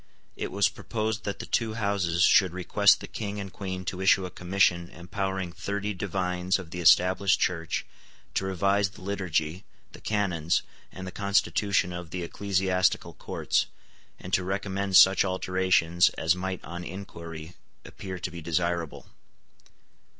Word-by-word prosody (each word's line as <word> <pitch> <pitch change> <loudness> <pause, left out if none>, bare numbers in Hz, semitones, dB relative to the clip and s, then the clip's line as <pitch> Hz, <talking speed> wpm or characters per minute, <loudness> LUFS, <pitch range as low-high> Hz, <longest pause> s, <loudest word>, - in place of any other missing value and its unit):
It - - -4
was 100 0 +3
proposed 110 +1 -3
that 100 - -3
the - - -6
two 110 -2 -1
Houses 100 -5 +1
should 95 -3 +5
request 100 +3 +4
the - - -7
King 105 -1 -5
and 95 -2 -7
Queen 95 -2 -5
to 95 0 -4
issue 95 0 +4
a 90 - -7
commission 90 -1 +1
empowering 95 +1 -4
thirty 100 +3 -3
divines 90 -1 -1
of 90 -4 -10
the 90 - -5
Established 95 +3 +5
Church 85 -3 -1 0.5
to - - 0
revise 100 +1 +1
the 95 - -15
liturgy, 95 -3 -2 0.3
the - - -13
canons, 90 -6 0 0.3
and 95 - -8
the 90 - -6
constitution 100 -2 +1
of 85 -2 -7
the 90 +1 -4
ecclesiastical 95 0 0
courts, - - -1 0.5
and 90 - -9
to 95 - +3
recommend 95 0 0
such 95 +1 +7
alterations 95 -2 +2
as 80 +2 +2
might 95 0 -4
on 85 +1 -6
inquiry 85 -3 -8 0.3
appear 95 -1 -7
to 90 - -5
be 85 -1 -8
desirable. 85 0 -2
95 Hz, 150 wpm, -27 LUFS, 85-100 Hz, 0.5 s, such